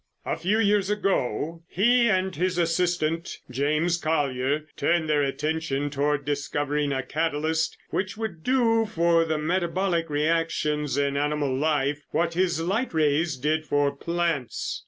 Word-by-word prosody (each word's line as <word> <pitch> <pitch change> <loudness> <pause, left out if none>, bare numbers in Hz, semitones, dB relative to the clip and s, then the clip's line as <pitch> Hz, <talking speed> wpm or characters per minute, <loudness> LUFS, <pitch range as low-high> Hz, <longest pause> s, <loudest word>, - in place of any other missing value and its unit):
"A - - -1
few 200 +5 0
years 205 -2 +2
ago, 165 - -1
he 235 +5 +3
and 190 -2 +1
his 180 +2 0
assistant, 170 -1 0
James 155 +6 +1
Collier, 145 -2 0
turned 165 +2 +1
their 150 -1 +2
attention 145 0 -1
toward 145 0 0
discovering 145 0 -1
a 135 -1 -1
catalyst 160 +3 -1
which 190 +2 -2
would 205 -8 -5
do 230 -3 +2
for 170 -4 +2
the 160 -1 -1
metabolic 170 +1 0
reactions 150 -2 0
in 140 0 +1
animal 145 -2 0
life 145 0 0
what 170 +1 0
his 175 -1 +1
light 190 +5 -1
rays 155 0 +2
did 155 +4 -1
for 145 -1 +1
plants. 170 -4 -2
160 Hz, 135 wpm, -25 LUFS, 145-175 Hz, -, he